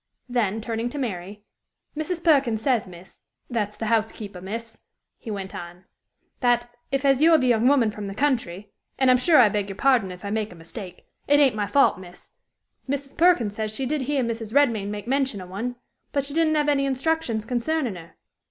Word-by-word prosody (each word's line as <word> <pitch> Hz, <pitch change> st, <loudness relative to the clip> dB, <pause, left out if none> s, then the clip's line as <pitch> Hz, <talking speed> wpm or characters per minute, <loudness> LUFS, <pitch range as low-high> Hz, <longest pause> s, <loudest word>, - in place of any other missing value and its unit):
Then, 225 Hz, -4 st, 0 dB
turning 230 Hz, +1 st, -3 dB
to 290 Hz, -, -7 dB
Mary, 205 Hz, -5 st, -5 dB, 0.5 s
"Mrs. 330 Hz, +3 st, -3 dB
Perkin 275 Hz, -9 st, +3 dB
says, 230 Hz, -2 st, 0 dB
miss 180 Hz, +1 st, -14 dB, 0.3 s
that's 210 Hz, -3 st, -1 dB
the 225 Hz, -, -4 dB
housekeeper, 215 Hz, -3 st, -1 dB
miss," 225 Hz, +4 st, -7 dB, 0.4 s
he 230 Hz, -, -9 dB
went 195 Hz, -2 st, -5 dB
on, 175 Hz, +1 st, -9 dB, 0.3 s
" -, -, -48 dB
that, 240 Hz, -1 st, +2 dB, 0.2 s
if 275 Hz, 0 st, 0 dB
as 270 Hz, 0 st, +4 dB
you're 325 Hz, 0 st, +7 dB
the 255 Hz, -, 0 dB
young 240 Hz, -1 st, +3 dB
woman 260 Hz, -6 st, +4 dB
from 210 Hz, -1 st, -6 dB
the 195 Hz, -, -6 dB
country 215 Hz, -8 st, -1 dB, 0.3 s
and 260 Hz, -1 st, +4 dB
I'm 250 Hz, -, +5 dB
sure 310 Hz, +4 st, +5 dB
I 240 Hz, -, +8 dB
beg 205 Hz, -1 st, -2 dB
your 195 Hz, -, -6 dB
pardon 240 Hz, -5 st, +2 dB
if 180 Hz, +2 st, -10 dB
I 200 Hz, -, -3 dB
make 215 Hz, -1 st, -2 dB
a -, -, -11 dB
mistake 180 Hz, +3 st, -10 dB, 0.2 s
it 290 Hz, 0 st, +5 dB
ain't 275 Hz, -6 st, +4 dB
my 205 Hz, -1 st, -1 dB
fault, 280 Hz, -8 st, +3 dB
miss 180 Hz, -1 st, -13 dB, 0.6 s
Mrs. 280 Hz, 0 st, -3 dB
Perkin 330 Hz, -, +4 dB
says 215 Hz, +1 st, -4 dB
she 265 Hz, -, -2 dB
did 295 Hz, +2 st, -1 dB
hear 270 Hz, 0 st, 0 dB
Mrs. 230 Hz, -1 st, -4 dB
Redmain 230 Hz, -8 st, +3 dB
make 205 Hz, -1 st, -5 dB
mention 265 Hz, -4 st, 0 dB
of 180 Hz, -1 st, -9 dB
one, 235 Hz, +6 st, -4 dB, 0.4 s
but 280 Hz, -1 st, 0 dB
she 280 Hz, -, -7 dB
didn't 320 Hz, -1 st, +2 dB
have 295 Hz, -1 st, +1 dB
any 275 Hz, -1 st, +2 dB
instructions 270 Hz, -5 st, -1 dB
concerning 250 Hz, +1 st, -1 dB
her. 170 Hz, -2 st, -12 dB
235 Hz, 205 wpm, -24 LUFS, 205-275 Hz, 0.6 s, I